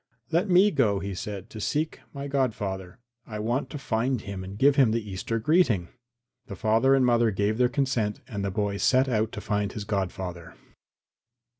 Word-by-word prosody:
"Let 180 +5 +1
me 185 +3 +6
go," 110 - +2
he 100 0 -4
said, 100 0 -6
"to 110 - -7
seek 150 +8 -1
my 140 0 -6
godfather. 105 -9 -2 0.3
I 110 - -6
want 120 +6 -1
to 150 - -6
find 125 -1 -1
him 100 -2 -6
and 95 +2 -8
give 140 +4 +5
him 135 -5 +5
the 110 -1 -1
Easter 100 +4 -3
greeting." 115 - +2 0.6
The 100 - -6
father 115 +6 +3
and 130 -2 +3
mother 120 -1 +4
gave 105 +2 0
their 125 -1 +4
consent 125 -6 0
and 105 -5 -4
the 100 - 0
boy 100 0 -1
set 130 +5 +3
out 110 -3 0
to - - -5
find 105 -1 -1
his 105 - -5
godfather. 95 -4 -4
110 Hz, 185 wpm, -26 LUFS, 100-130 Hz, 0.6 s, me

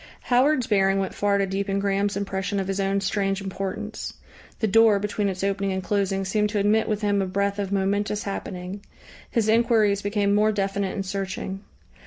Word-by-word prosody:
Howard's 255 +1 +3
bearing 195 -2 +2
went 195 -1 -1
far 205 -1 +1
to 200 - +2
deepen 195 +1 -2
Graham's 200 0 0
impression 200 0 -2
of 190 - -2
his 195 0 -2
own 195 0 +1
strange 195 0 0
importance; 195 +2 -5 0.4
the - - 0
door 220 0 +5
between 205 0 -1
its 190 0 -4
opening 195 0 0
and 190 0 -2
closing 195 -1 0
seemed 210 +2 +1
to 210 - -2
admit 210 +3 +2
with 215 0 -1
him 205 -1 +2
a 190 - -1
breath 200 +2 -1
of 200 -1 -2
momentous 200 +1 0
happening. 195 0 -5 0.5
His 230 -3 +1
enquiries 220 -3 +3
became 200 0 +1
more 210 +1 +4
definite 195 -1 -1
and 195 - -3
searching. 195 0 -4
200 Hz, 185 wpm, -24 LUFS, 195-210 Hz, 0.5 s, door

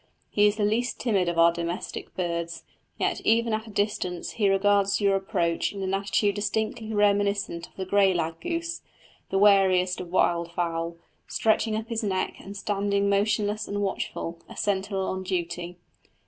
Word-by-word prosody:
He 205 0 +5
is 205 - +1
the 210 -1 +1
least 220 +2 0
timid 195 -7 +1
of 170 - -3
our 170 0 +6
domestic 170 +1 -5
birds, 170 -2 -3 0.3
yet - - 0
even 230 0 +2
at 220 +1 -2
a - - -9
distance 205 -4 -2
he 205 -3 +1
regards 200 0 +3
your 200 -2 +3
approach 185 -4 0
in 195 -1 -5
an 190 0 -1
attitude 200 +1 +1
distinctly 215 +2 -2
reminiscent 205 -4 +1
of - - -29
the 190 - -4
grey 195 0 +4
lag 165 -2 -2
goose, 335 0 -3 0.5
the 195 - 0
wariest 190 -3 +4
of 180 - -7
wild 170 -1 +1
fowl, 170 -1 -2 0.3
stretching 220 0 +1
up 220 +1 -3
his 230 -1 -1
neck 190 -3 -1
and 200 +1 -9
standing 200 0 0
motionless 210 +1 +1
and 205 0 -2
watchful, 170 -3 -3
a - - -11
sentinel 195 -1 -1
on 190 0 -2
duty. 175 -1 -3
200 Hz, 170 wpm, -26 LUFS, 180-210 Hz, 0.5 s, our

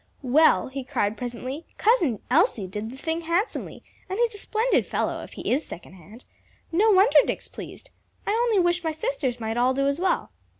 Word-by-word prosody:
"Well," 275 +2 +4
he 270 0 -5
cried 215 -4 -1
presently, 250 +6 -6
"Cousin 345 - +2
Elsie 295 - +3
did 210 +4 -5
the 260 - -10
thing 320 +4 -2
handsomely! 340 +6 -2 0.3
and 380 - -3
he's 475 -1 +1
a 410 - -7
splendid 445 +5 +1
fellow, - - -2
if - - -11
he - - -4
is 275 +5 +2
second 170 - -10
hand. 200 +7 -15 0.5
No 400 +7 +3
wonder 400 +3 +6
Dick's - - -3
pleased. - - -10 0.3
I - - 0
only 460 0 +2
wish 350 -1 +2
my 325 - 0
sisters 310 - -2
might 225 0 -3
all 250 +2 +2
do 275 0 +1
as 280 +3 0
well." 370 0 0
310 Hz, 190 wpm, -25 LUFS, 245-390 Hz, 0.5 s, wonder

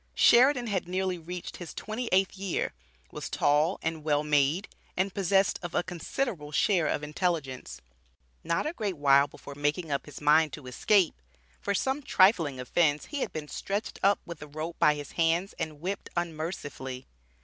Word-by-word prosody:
Sheridan 250 +1 +6
had 195 -6 -2
nearly 185 0 -1
reached 175 +2 -7
his 175 - -8
twenty 225 +3 -4
eighth 190 +1 +3
year, 195 -2 -2 0.4
was - - -6
tall 150 +5 +2
and 165 -1 -2
well 150 -1 +2
made, 150 +4 +2 0.3
and 190 +1 0
possessed 195 0 +2
of 175 -2 -6
a - - +2
considerable 175 - -3
share 170 +1 +2
of 150 - -1
intelligence. 150 - -2 0.6
Not 170 - 0
a 305 - -2
great 205 - -3
while 140 0 +5
before 140 - -11
making 145 +3 -1
up 140 - -2
his 145 - -9
mind 150 0 +4
to 145 - -8
escape, 175 +8 +3 0.5
for 200 - -1
some 265 +7 0
trifling 185 - +3
offence 145 +3 +1
he 290 - -1
had - - -2
been 155 -1 -5
"stretched 200 +7 -4
up 200 +1 +4
with 170 -4 -8
a 150 - -7
rope 155 +3 -6
by 150 - +5
his 145 -1 -7
hands," 170 +3 +1
and 155 -2 -4
"whipped 190 +3 -4
unmercifully." 155 -6 -4
170 Hz, 170 wpm, -29 LUFS, 150-195 Hz, 0.6 s, Sheridan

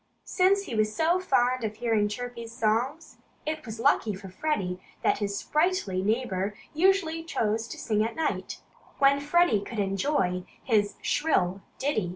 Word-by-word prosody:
Since 390 +2 +3
he 305 - -7
was 215 -1 +1
so 335 +3 +2
fond 255 -8 +2
of 215 -1 -2
hearing 220 -2 +1
Chirpy's 235 +1 -6
songs, 240 +7 -1 0.3
it 310 0 -3
was 220 0 -6
lucky 220 -2 +2
for 190 0 -9
Freddie 185 -6 -2 0.2
that - - +2
his 200 -1 -2
sprightly 305 - 0
neighbor 205 -2 -1 0.2
usually 330 -1 +2
chose 225 -8 -1
to - - -8
sing 215 -1 0
at 225 - -3
night, 320 -1 -2 0.4
when 280 0 +5
Freddie 295 -5 +3
could 220 +3 -7
better 205 - +2
enjoy 195 -2 0 0.2
his 210 -4 +2
shrill 195 - +1 0.2
ditty. 220 -10 0
230 Hz, 160 wpm, -27 LUFS, 205-305 Hz, 0.4 s, when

